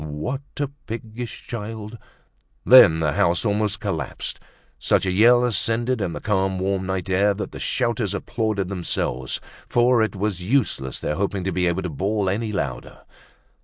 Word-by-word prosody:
What 75 - -4 0.2
a 145 - +1 0.2
piggish 115 +1 -6
child!" 110 0 -6 0.7
Then 85 -11 +8
the 75 -2 +1
house 85 +7 +2
almost 105 0 0
collapsed, 80 -10 -4 0.4
such - - +2
a 95 - +1
yell 120 +6 +5
ascended 120 +1 +1
in 90 -4 -2
the - - -5
calm 95 -2 0
warm 95 0 -1
night 95 -2 -2
air 100 +2 +2
that 105 - -5
the - - -8
shouters 115 -5 -1
applauded 105 -3 -2
themselves, 85 -8 -2 0.3
for 120 0 +3
it 110 -1 0
was 100 -2 -2
useless 90 - 0
their 75 - -3
hoping 100 -1 -1
to 95 - -1
be 90 0 +1
able 85 +2 0
to 90 - -3
bawl 100 +6 -1
any 110 +3 -2
louder. 105 - -4
100 Hz, 165 wpm, -23 LUFS, 90-115 Hz, 0.7 s, Then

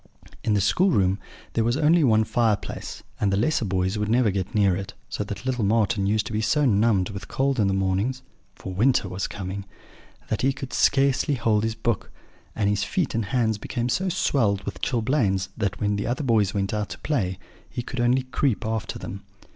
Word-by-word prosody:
In 105 - +2
the 100 - +2
schoolroom 100 - +2 0.3
there 115 - +1
was 120 +3 +1
only 160 +2 +4
one 110 -4 +4
fireplace, 110 -2 -1 0.2
and 100 -2 +1
the 95 - +1
lesser 120 +2 +1
boys 95 +1 0
could 105 0 -1
never 115 -2 +3
get 95 +2 -3
near 100 -3 +4
it, 100 +1 -6
so - - -2
that 100 +3 -7
little 125 -3 0
Marten 105 -1 +2
used 105 +1 +1
to 110 - -6
be 110 - 0
so 145 +7 +2
numbed 105 -4 +3
with 100 -3 -7
cold 135 -1 0
in 105 - +3
the 95 - +1
mornings 95 +7 0 0.3
(for 95 - -7
winter 115 +2 +2
was 90 +1 -3
coming) 100 0 -5 0.7
that 110 - -1
he 135 +1 +2
could 135 -2 -7
scarcely 140 +1 +3
hold 115 -3 +1
his 115 0 -1
book; 110 -2 -2 0.5
and 105 -2 +1
his 105 0 +1
feet 180 -8 -1
and 115 -2 0
hands 110 0 0
became 120 +2 -3
so 190 +9 0
swelled 110 - +1
with - - -6
chilblains 110 -6 +1
that, 100 -3 -2
when 105 -1 0
the 100 - -2
other 125 +5 -1
boys 110 -6 +2
went 100 0 -1
out 105 -1 -2
to - - -7
play, 95 -12 -1 0.3
he 120 - -4
could 125 +1 -6
only 125 +2 +3
creep 130 -4 -1
after 110 -1 -3
them. 100 - -7
110 Hz, 205 wpm, -25 LUFS, 100-125 Hz, 0.7 s, only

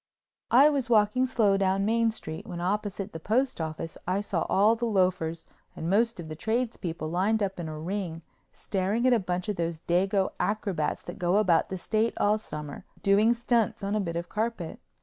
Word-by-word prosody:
I 265 +5 +7
was 275 -4 0
walking 225 +3 +3
slow 210 -6 +3
down 195 0 +1
Main 230 +1 +2
Street 160 -8 -6
when 175 - -6
opposite 200 +2 -2
the 165 - -6
postoffice 165 -7 -2
I 185 +2 +1
saw 195 -4 -2
all 210 +4 +4
the 235 +1 -2
loafers 185 -5 0 0.3
and 165 +2 -3
most 230 +1 +2
of 165 - -6
the 155 - -6
tradespeople 220 -6 -2
lined 200 +6 +1
up 190 -2 -3
in 165 -2 -4
a 155 - -6
ring 170 0 -4 0.3
staring 200 +5 -1
at 255 - +5
a 235 - +4
bunch 180 -1 -3
of 210 - -2
those 165 -1 -2
dago 190 +3 +1
acrobats 200 -7 -1
that 175 - -8
go 180 +2 +2
about 185 -6 +3
the 190 - -3
State 220 +5 0
all 210 +1 +2
summer 150 -8 -7 0.2
doing 210 +4 +4
stunts 235 -3 0
on 200 +1 -1
a 215 - +1
bit 170 -4 -3
of 170 +1 -3
carpet. 215 -6 -3
195 Hz, 190 wpm, -28 LUFS, 175-220 Hz, 0.3 s, I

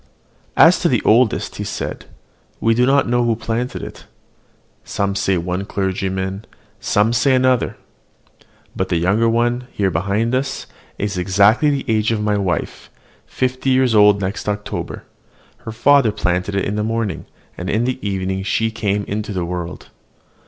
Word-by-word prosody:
"As - - +7
to - - +1
the - - +1
oldest," 115 0 +3
said - - -5
he, - - -26 0.5
"we 115 +1 +2
do 125 +2 +2
not 140 +1 +3
know 120 0 +2
who 115 -1 +1
planted 115 +3 -3
it, - - -9 0.8
some 100 0 -2
say 95 -1 +1
one 90 +3 -2
clergyman, 95 0 -3 0.5
and 110 +3 +3
some 120 +4 +3
another: 130 -1 +2 1.0
but 95 0 -2
the 85 - +1
younger 100 +7 +2
one, 120 +2 0
there 95 -2 +1
behind 100 +8 0
us, 130 +2 -2 0.3
is 100 -2 -2
exactly 100 - +3
the 140 -2 -1
age 110 -1 +1
of 110 - 0
my 105 0 0
wife, 95 -3 -3 0.4
fifty 130 +1 -1
years 130 -2 +3
old 105 -1 +5
next 100 +2 -3
October; 105 0 -4 0.6
her 110 - -4
father 135 0 +4
planted 90 +1 -1
it 95 - 0
in 105 +1 -2
the 105 - 0
morning, 115 -2 -2 0.3
and 90 +2 -5
in 110 +3 +1
the 130 +1 -2
evening 95 -1 -2
she 110 +3 0
came 105 -2 -1
into 105 +1 -4
the 90 -3 -2
world. 90 0 -6
105 Hz, 160 wpm, -19 LUFS, 95-120 Hz, 1.0 s, As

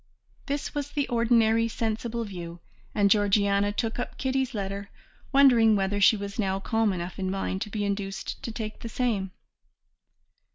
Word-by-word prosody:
This 285 +1 -3
was 290 -1 -3
the 290 -1 -1
ordinary, 230 -1 +3
sensible 230 +1 -2
view, 175 -5 -7 0.4
and 205 -1 +4
Georgiana 200 -1 +3
took 225 +3 -2
up 245 - -4
Kitty's 265 -1 -1
letter 200 0 -4 0.4
wondering 245 -6 +6
whether 200 +1 0
she 215 +2 +6
was 200 +2 -6
now 195 -2 0
calm 225 +1 +1
enough 180 +1 -5
in 190 -1 -1
mind 190 0 -2
to 210 - -3
be 205 0 -2
induced 200 0 -4
to 230 - -5
take 220 -1 -6
the 230 - -6
same. 220 -6 -1
215 Hz, 160 wpm, -27 LUFS, 200-235 Hz, 0.4 s, wondering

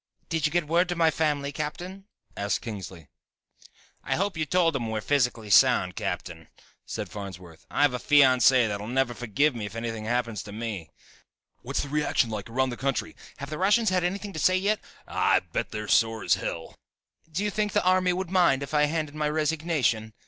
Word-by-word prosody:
"Did 160 -2 +1
you - - -6
get 175 0 +1
word 175 +3 +2
to 175 - -1
my 165 -1 +3
family, 145 -3 -1
Captain?" 175 +7 -6 0.3
asked 100 0 -1
Kingsley. 95 - -8 1.0
"I - - -1
hope 195 +2 -1
you 155 -1 -2
told 175 +1 +2
them 120 -5 -2
we're 110 0 -2
physically 120 -4 0
sound, - - +5
Captain," - - -5 0.4
said - - -4
Farnsworth. 90 -5 -10
"I - - +1
have 145 -3 +4
a 125 - -2
fiancée 130 -3 +5
that'll 105 0 -4
never 130 0 0
forgive 120 +5 +1
me 110 -4 -4
if 100 - -11
anything 115 -1 -4
happens 115 -2 -1
to 105 - -10
me 105 -7 -5 0.4
" - - -50
"What's - - -2
the 140 - -7
reaction 145 -5 +1
like 105 0 -5
around 130 +2 0
the 120 - -6
country 135 0 -2
" - - -22
"Have 140 +1 -7
the 155 - -4
Russians 210 +4 +3
had 180 -1 +1
anything 200 +3 -3
to 160 - -5
say 185 +5 +3
yet 205 +3 +1 0.2
" - - -28
"Ha! - - +1
I'll - - +3
bet - - -1
they're 105 0 -5
sore 115 +1 +2
as 90 - +3
hell 85 -3 -4 0.2
" 160 - -37
"Do 180 +6 -2
you 210 - 0
think 210 -1 -1
the - - +2
army 185 0 +3
would 185 0 -3
mind 170 -8 +3
if 140 - -8
I 150 0 +4
hand 155 +1 -1
in 145 +1 -12
my 150 -1 +1
resignation?" 150 -8 0
140 Hz, 215 wpm, -26 LUFS, 115-165 Hz, 1.0 s, sound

